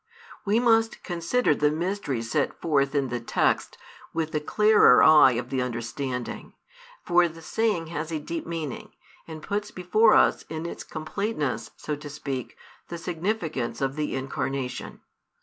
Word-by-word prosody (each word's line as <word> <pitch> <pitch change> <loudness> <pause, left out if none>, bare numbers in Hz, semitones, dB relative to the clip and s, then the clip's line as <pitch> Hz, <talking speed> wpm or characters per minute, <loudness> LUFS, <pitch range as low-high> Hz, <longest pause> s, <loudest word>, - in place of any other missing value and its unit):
We 210 +3 +3
must 225 -2 +2
consider 175 +4 +1
the 150 0 +2
mysteries 150 - -3
set - - 0
forth 140 -3 +1
in 140 -2 +1
the 120 0 -2
text 115 - 0 0.4
with 160 -1 -1
the 150 - 0
clearer 210 +7 +5
eye 155 -4 +7
of 120 +1 -4
the 130 -1 0
understanding; 125 +1 -4 0.5
for 175 0 +4
the 165 0 -11
saying 215 -4 0
has 155 +2 -4
a 160 - -1
deep 160 +2 -5
meaning, 160 -6 -5 0.3
and 160 -1 -9
puts 205 +1 -2
before 215 +5 +3
us - - +4
in 160 +1 -5
its 170 - -6
completeness, 155 - -3
so 150 - -4
to 145 0 -9
speak, 140 -3 -5 0.3
the 170 - -6
significance 165 - -3
of 135 0 -1
the 150 -2 -2
Incarnation. 135 -1 -4
155 Hz, 150 wpm, -26 LUFS, 135-180 Hz, 0.5 s, eye